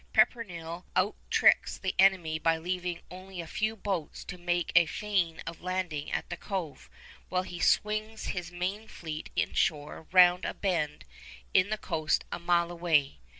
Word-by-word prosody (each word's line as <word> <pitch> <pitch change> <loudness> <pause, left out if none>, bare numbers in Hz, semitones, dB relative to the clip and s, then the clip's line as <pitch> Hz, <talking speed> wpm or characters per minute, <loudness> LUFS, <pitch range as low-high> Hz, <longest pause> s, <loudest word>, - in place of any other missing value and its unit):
Pepperrell 175 -7 +1
out 195 +4 +2
tricks - - +4
the 190 - -2
enemy 180 -5 +4
by 165 0 +2
leaving 180 +1 -3
only 185 0 -9
a 170 - -4
few 215 +6 -1
boats 190 -7 -3
to 180 - -8
make 175 -1 0
a 170 -1 +7
feint 185 -3 -1
of 165 0 -7
landing 180 -5 -3
at - - -2
the - - -2
Cove, 185 -7 -5 0.4
while 185 0 0
he 175 -1 -7
swings 215 +3 +1
his 175 -1 -5
main 190 +5 -3
fleet 155 -5 -7
inshore 150 0 0
round 180 0 +6
a - - -3
bend 165 -6 -1 0.5
in 185 +2 +4
the 215 - 0
coast 155 -6 0
a - - -3
mile 170 0 +2
away. 160 - +1
175 Hz, 160 wpm, -30 LUFS, 165-190 Hz, 0.5 s, a